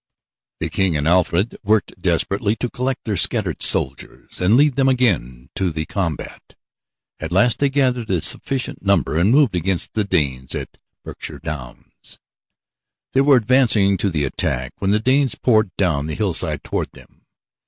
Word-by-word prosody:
The -, -, -3 dB
King 95 Hz, -5 st, +1 dB
and 75 Hz, +1 st, -1 dB
Alfred 90 Hz, +4 st, +1 dB
worked 105 Hz, +1 st, +1 dB
desperately 100 Hz, +2 st, 0 dB
to 125 Hz, +1 st, -4 dB
collect 130 Hz, +1 st, -3 dB
their 105 Hz, -, -2 dB
scattered -, -, 0 dB
soldiers 65 Hz, +6 st, 0 dB
and 100 Hz, +6 st, +4 dB
lead 145 Hz, -1 st, +3 dB
them 135 Hz, -1 st, +3 dB
again 80 Hz, -, 0 dB
to 95 Hz, -2 st, -1 dB
the 80 Hz, -1 st, -4 dB
combat. 85 Hz, -6 st, -5 dB, 0.6 s
At 80 Hz, +1 st, -6 dB
last 100 Hz, +6 st, +3 dB
they 140 Hz, -, +2 dB
gathered 130 Hz, -4 st, 0 dB
a 95 Hz, -3 st, +1 dB
sufficient 135 Hz, -, -1 dB
number 100 Hz, -5 st, +1 dB
and 90 Hz, +4 st, +3 dB
moved 135 Hz, -3 st, +4 dB
against 90 Hz, +1 st, -1 dB
the 110 Hz, -, 0 dB
Danes 65 Hz, -9 st, -1 dB
on -, -, -3 dB, 0.4 s
Berkshire -, -, -7 dB
Downs. 65 Hz, -5 st, -9 dB, 1.0 s
They 135 Hz, -, +4 dB
were 140 Hz, 0 st, +5 dB
advancing 115 Hz, -5 st, +3 dB
to 100 Hz, +2 st, 0 dB
the 75 Hz, -5 st, -1 dB
attack 65 Hz, -1 st, -3 dB
when 95 Hz, -, -1 dB
the 105 Hz, +2 st, +3 dB
Danes 130 Hz, +3 st, +2 dB
poured 110 Hz, -4 st, +2 dB
down 80 Hz, -7 st, 0 dB
the 80 Hz, -, -4 dB
hillside 95 Hz, -7 st, -2 dB
toward -, -, -4 dB
them. -, -, -19 dB
100 Hz, 165 wpm, -20 LUFS, 80-125 Hz, 1.0 s, were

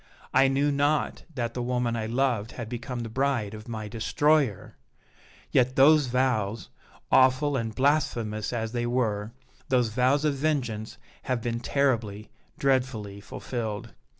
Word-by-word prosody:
I 135 Hz, +1 st, +5 dB
knew 140 Hz, +2 st, +2 dB
not 145 Hz, +2 st, 0 dB
that 120 Hz, -3 st, -2 dB
the 125 Hz, -, -3 dB
woman 125 Hz, -1 st, 0 dB
I 110 Hz, -1 st, -2 dB
loved 120 Hz, -2 st, 0 dB
had 120 Hz, -3 st, -6 dB
become 120 Hz, +1 st, -5 dB
the 115 Hz, -, -4 dB
bride 130 Hz, -4 st, 0 dB
of 110 Hz, +1 st, -9 dB
my 110 Hz, -2 st, -5 dB
destroyer! 130 Hz, +1 st, +1 dB, 0.8 s
Yet 130 Hz, +1 st, +3 dB
those 145 Hz, +1 st, +6 dB
vows, 120 Hz, -4 st, 0 dB, 0.4 s
awful 130 Hz, +2 st, +4 dB
and 115 Hz, -4 st, -2 dB
blasphemous 120 Hz, -7 st, 0 dB
as 115 Hz, -2 st, -2 dB
they 120 Hz, 0 st, -1 dB
were, 110 Hz, -4 st, -1 dB, 0.4 s
those 125 Hz, -3 st, +2 dB
vows 130 Hz, +6 st, +2 dB
of 150 Hz, -, +2 dB
vengeance 130 Hz, -7 st, -2 dB, 0.3 s
have 130 Hz, -2 st, 0 dB
been 115 Hz, -1 st, -2 dB
terribly, 115 Hz, -6 st, -1 dB, 0.3 s
dreadfully 125 Hz, -7 st, 0 dB
fulfilled! 110 Hz, 0 st, -5 dB
125 Hz, 140 wpm, -27 LUFS, 110-135 Hz, 0.8 s, those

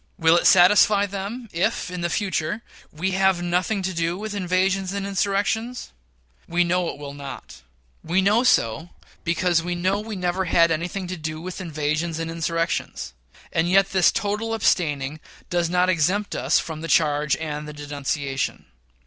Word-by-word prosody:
Will 165 Hz, 0 st, +4 dB
it 175 Hz, -, +4 dB
satisfy 200 Hz, +2 st, +6 dB
them 200 Hz, +5 st, -5 dB
if, 170 Hz, +1 st, -1 dB
in 180 Hz, -1 st, -5 dB
the 170 Hz, -, 0 dB
future, 200 Hz, +2 st, -2 dB, 0.3 s
we 175 Hz, +5 st, -2 dB
have 190 Hz, -2 st, +2 dB
nothing 180 Hz, +3 st, 0 dB
to 185 Hz, 0 st, -2 dB
do 170 Hz, +1 st, -1 dB
with 215 Hz, +1 st, -5 dB
invasions 190 Hz, 0 st, 0 dB
and, 200 Hz, -1 st, -3 dB
insurrections? 205 Hz, +5 st, -1 dB, 0.6 s
We 175 Hz, +1 st, +2 dB
know 175 Hz, 0 st, 0 dB
it -, -, -5 dB
will 140 Hz, -1 st, -8 dB
not. 140 Hz, -, -9 dB, 0.4 s
We 170 Hz, +3 st, -1 dB, 0.3 s
so 115 Hz, -, +3 dB
know 165 Hz, +2 st, -13 dB, 0.3 s
because 170 Hz, 0 st, +1 dB
we 175 Hz, +1 st, -3 dB
know 185 Hz, +3 st, 0 dB
we 215 Hz, 0 st, -6 dB
never 180 Hz, 0 st, -1 dB
had 170 Hz, -1 st, +4 dB
anything 175 Hz, +4 st, -2 dB
to 180 Hz, 0 st, -5 dB
do 155 Hz, 0 st, -5 dB
with 185 Hz, +3 st, -6 dB
invasions 155 Hz, 0 st, -2 dB
and 165 Hz, 0 st, -3 dB
insurrections; 165 Hz, -, -2 dB, 0.4 s
and 165 Hz, +2 st, +1 dB
yet 195 Hz, +1 st, +4 dB
this 190 Hz, -2 st, +4 dB
total 215 Hz, +2 st, -2 dB
abstaining 150 Hz, -8 st, 0 dB, 0.3 s
does 175 Hz, -1 st, +1 dB
not 180 Hz, +1 st, +2 dB
exempt 185 Hz, +4 st, +1 dB
us 135 Hz, +5 st, +2 dB
from 160 Hz, -2 st, -4 dB
the 165 Hz, -, -5 dB
charge 150 Hz, -2 st, +2 dB
and 150 Hz, -1 st, -5 dB
the -, -, -6 dB
denunciation. 145 Hz, -2 st, -3 dB
175 Hz, 165 wpm, -23 LUFS, 160-195 Hz, 0.6 s, satisfy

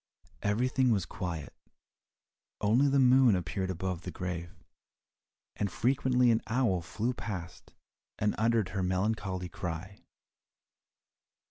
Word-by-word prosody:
Everything 125 Hz, +5 st, +2 dB
was 100 Hz, -7 st, +2 dB
quiet, 85 Hz, -2 st, -5 dB, 1.1 s
only 115 Hz, +7 st, +3 dB
the 140 Hz, 0 st, +3 dB
moon 130 Hz, -4 st, +6 dB
appeared 95 Hz, +2 st, -2 dB
above 95 Hz, -1 st, -3 dB
the 90 Hz, -, -6 dB
grave, 90 Hz, -1 st, -4 dB, 1.1 s
and 100 Hz, -2 st, -2 dB
frequently 125 Hz, 0 st, +3 dB
an 115 Hz, -, +2 dB
owl 110 Hz, -7 st, +1 dB
flew 110 Hz, +8 st, -2 dB
past 90 Hz, -7 st, -7 dB, 0.4 s
and 105 Hz, 0 st, +1 dB
uttered 110 Hz, -3 st, +2 dB
her 95 Hz, 0 st, -2 dB
melancholy 95 Hz, 0 st, -1 dB
cry. 85 Hz, +3 st, -6 dB
100 Hz, 110 wpm, -30 LUFS, 90-120 Hz, 1.1 s, moon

